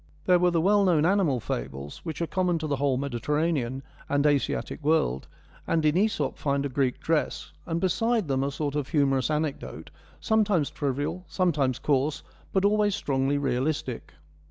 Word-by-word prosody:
There 180 -1 +5
were 180 0 +4
the 170 -1 +1
well 200 +4 +4
known 165 -5 +3
animal 180 -8 +2
fables 70 - -5
which 165 0 -4
are - - +1
common 180 0 0
to 160 - -4
the 145 -2 -1
whole 135 -1 +1
Mediterranean 140 0 -1 0.3
and 145 +1 +1
Asiatic 145 +1 0
world, 140 - +1 0.4
and 160 -2 +1
in 150 - +4
Msop 185 -6 0
find 140 -1 0
a - - -2
Greek 130 -1 0
dress, 160 -1 -1 0.2
and 165 0 -1
beside 220 +3 +1
them 135 -1 0
a 140 - 0
sort 145 0 -3
of 145 -2 -2
humorous 135 -3 +1
anecdote, 150 -1 -3 0.3
sometimes 210 - +1
trivial, 145 +5 -2
sometimes 145 -9 +1
coarse, 145 0 0 0.3
but 190 0 +2
always 205 -1 +3
strongly 135 -5 0
realistic. 130 - -2
150 Hz, 165 wpm, -27 LUFS, 135-175 Hz, 0.4 s, There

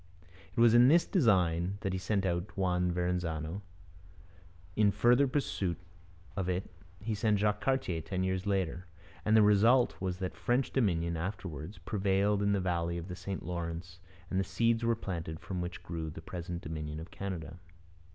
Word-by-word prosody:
It - - +1
was 115 -1 +7
in 120 +1 +8
this 165 +5 +5
design 95 - +2
that 95 - -1
he 95 - -1
sent 100 0 0
out 85 +2 -2
Juan 90 -2 +1
Verrazano; 90 -1 -2 1.1
in 105 0 +4
further 120 +6 +4
pursuit 115 - -1 0.6
of 95 -2 -1
it 90 +1 -2 0.3
he 110 +2 -3
sent 105 0 +2
Jacques 105 +1 +1
Cartier 130 -11 0
ten 95 +3 -2
years 95 +1 -1
later; 95 -2 -1 0.4
and 110 +1 +4
the 110 - +7
result 110 +5 +4
was 95 -1 -2
that 95 -1 -4
French 125 +2 0
dominion 85 -9 +1
afterwards, 90 -1 -5
prevailed 100 0 +1
in 100 0 +2
the 100 - +2
valley 85 -2 -1
of 85 +2 -6
the 90 - -4
St 95 -1 -5
Lawrence 85 0 -5 0.3
and 95 +1 +1
seeds 115 +4 +1
were 115 0 +3
planted 85 -7 -5
from 90 -2 -4
which 90 +1 -5
grew 80 -2 -4
the 80 - -8
present 85 +1 -6
Dominion 75 -1 -5
of 80 - -9
Canada. 90 -4 -5
95 Hz, 170 wpm, -32 LUFS, 85-105 Hz, 1.1 s, in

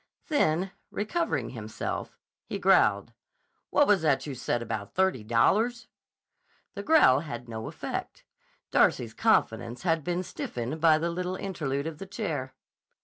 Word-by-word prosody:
Then, 185 - +1 0.2
recovering 330 +12 -2
himself, - - -5 0.3
he - - -3
growled: - - +3 0.6
"What 290 - +4
was 205 - +4
that 155 - +2
you 145 - -5
said 120 -1 -2
about - - -5
thirty 190 - +1
dollars?" 215 - +2 0.8
The 200 - -5
growl 205 - +5
had 125 -6 -7
no 110 -1 -6
effect. - - -6 0.5
Darcy's - - +3
confidence 120 +1 +1
had 165 -3 +1
been 175 +2 -1
stiffened 125 -2 -5
by 160 -2 +6
the 170 +2 -1
little 180 +1 -3
interlude 150 -8 -3
of 160 -1 -5
the 195 - -7
chair. 155 - -4
165 Hz, 140 wpm, -28 LUFS, 130-195 Hz, 0.8 s, by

